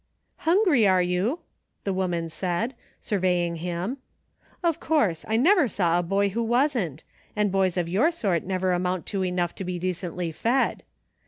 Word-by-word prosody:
" - - -46
Hungry, 340 - +4
are 185 -1 +4
you. 185 - 0
* - - -48
" - - -49
the 195 - -1
woman 175 -3 -1
said, 180 +8 -2 0.3
surveying 180 -4 0
him; 180 +9 -3 0.6
"of 335 -3 +1
course; 210 - +1
I 220 - +1
never 335 - +5
saw 175 -5 +1
a - - +2
boy 195 +3 +1
who 225 +4 -2
wasn't; 235 - 0 0.3
and 210 -2 +1
boys 190 -2 +1
of 175 -2 0
your 205 - +3
sort 200 - 0
never 185 0 0
amount 180 0 -1
to 195 -1 0
enough 180 -1 -1
to - - -6
be 180 -1 -3
decently 180 -1 -3
fed. 240 - 0
185 Hz, 175 wpm, -25 LUFS, 175-230 Hz, 0.6 s, never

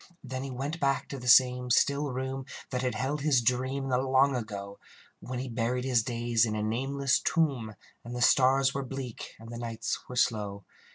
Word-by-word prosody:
Then 130 -1 -5
he 135 - -5
went 140 +6 -4
back 140 -2 0
to 140 - -5
the 125 - -8
same 125 0 +5
still 140 +4 +3
room 130 +1 -4 0.2
That 125 -1 -1
had 125 -3 -1
held 135 +6 -2
his 145 -3 +3
dream 130 +3 0
in 135 - -4
the 125 - +3
long 135 +1 +3
ago, 100 -4 -6 0.4
When 125 0 -6
he 130 +2 -4
buried 125 +1 -1
his 125 -3 +3
days 120 -1 0
in 110 -2 0
a 105 - -2
nameless 135 +4 0
tomb, 135 -10 0 0.3
And 120 +1 -7
the 125 - -3
stars 135 +1 +4
were 140 - -2
bleak, 130 -3 -7
and 115 +1 -11
the 120 - -6
nights 115 -1 -3
were 125 - -6
slow. 105 -5 0
125 Hz, 205 wpm, -29 LUFS, 120-135 Hz, 0.4 s, same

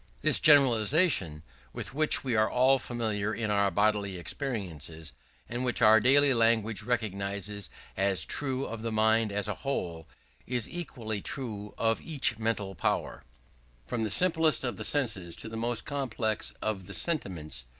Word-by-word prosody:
This 155 - +3
generalization, 130 - +4 0.3
with - - -4
which 155 +2 +2
we 130 -4 -1
are 110 0 +3
all 130 +2 +3
familiar 110 -4 -2
in 110 -2 -2
our 100 -1 +2
bodily 100 -2 0
experiences, 85 - -5 0.3
and 120 +2 -4
which 125 -2 -1
our 110 +1 +7
daily 140 +4 +5
language 115 -2 +2
recognizes 100 -3 -3 0.3
as 95 0 +1
true 135 -2 -1
of 115 0 -6
the 115 0 -3
mind 110 0 +2
as 100 0 -1
a 105 - -1
whole, 85 - -3 0.4
is 125 -2 -2
equally 115 -12 -5
true 105 -6 -5
of 115 0 +1
each 130 -8 0
mental 110 -3 -2
power, 85 - -2 0.6
from 115 - -3
the 110 - -1
simplest 160 - +3
of 120 -6 -3
the - - -5
senses 105 - -1
to - - -7
the 110 - -7
most 115 +1 -2
complex 125 -6 -2
of 100 -4 -3
the 95 - -6
sentiments. 85 - -2
110 Hz, 155 wpm, -29 LUFS, 100-130 Hz, 0.6 s, our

